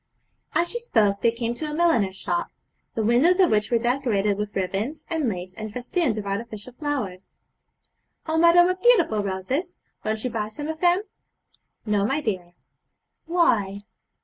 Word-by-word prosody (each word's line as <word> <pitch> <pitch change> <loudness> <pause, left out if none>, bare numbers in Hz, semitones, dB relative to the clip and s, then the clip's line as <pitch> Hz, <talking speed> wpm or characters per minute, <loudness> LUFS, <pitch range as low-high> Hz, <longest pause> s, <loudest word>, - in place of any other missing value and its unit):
As 345 - +2
she 475 - -2
spoke 215 - +1
they 235 - +4
came 230 0 -2
to 305 +5 -5
a 300 - -4
milliner's 275 - +2
shop, 345 - -2 0.5
the 225 - 0
windows 265 - +4
of 370 -3 +5
which 210 +1 +2
were 235 - +3
decorated 230 -5 +1
with 210 0 -4
ribands 195 - -2
and 315 -6 +1
lace 185 -2 -5
and 215 +1 -6
festoons 250 - -1
of 210 - -4
artificial 215 +3 -5
flowers. 245 -10 -4 0.9
'Oh 320 0 0
mother, 340 +1 +7
what 365 +1 -1
beautiful 350 - +4
roses! 255 - -3 0.3
Won't 215 0 -2
you 250 - -2
buy 215 -2 -2
some 290 +8 -6
of 320 0 -4
them?' 355 +2 +3 0.8
'No, 210 -2 +1
my 270 +8 +1
dear.' 185 -9 -4 0.7
'Why?' 210 - +1
235 Hz, 165 wpm, -24 LUFS, 205-320 Hz, 0.9 s, mother